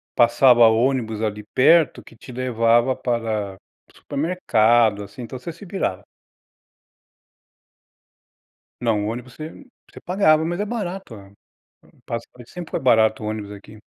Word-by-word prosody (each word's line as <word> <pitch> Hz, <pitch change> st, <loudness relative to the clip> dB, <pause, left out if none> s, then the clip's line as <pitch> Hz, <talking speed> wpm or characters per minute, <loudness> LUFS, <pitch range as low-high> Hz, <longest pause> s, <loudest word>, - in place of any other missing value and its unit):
passava 120 Hz, 0 st, +5 dB
ônibus 115 Hz, -1 st, +1 dB
ali 105 Hz, -1 st, -3 dB
perto, 155 Hz, +2 st, +4 dB
que -, -, -17 dB
te 125 Hz, -, -13 dB
levava 120 Hz, 0 st, +1 dB
para 110 Hz, -5 st, -2 dB, 0.3 s
o -, -, -26 dB
supermercado, 120 Hz, -, +1 dB
assim. 100 Hz, +5 st, -11 dB
Então, 125 Hz, +2 st, -7 dB
você 165 Hz, +7 st, -7 dB
se 170 Hz, -, -14 dB
virava. 180 Hz, -, -3 dB, 2.8 s
Não, 110 Hz, -4 st, 0 dB
o -, -, -2 dB
ônibus 125 Hz, +1 st, -8 dB
você 155 Hz, +1 st, -7 dB, 0.4 s
você -, -, -12 dB
pagava. 160 Hz, -4 st, +2 dB
Mas 175 Hz, +3 st, -3 dB
é 205 Hz, -, -1 dB
barato, 195 Hz, -, -5 dB
a 100 Hz, -1 st, -14 dB, 0.8 s
passagem 115 Hz, +1 st, -7 dB
sempre 175 Hz, +1 st, -9 dB
foi -, -, -1 dB
barato 110 Hz, -4 st, +3 dB
o -, -, -3 dB
ônibus 105 Hz, -1 st, -5 dB
aqui. 105 Hz, +1 st, -13 dB
120 Hz, 140 wpm, -22 LUFS, 110-155 Hz, 2.8 s, passava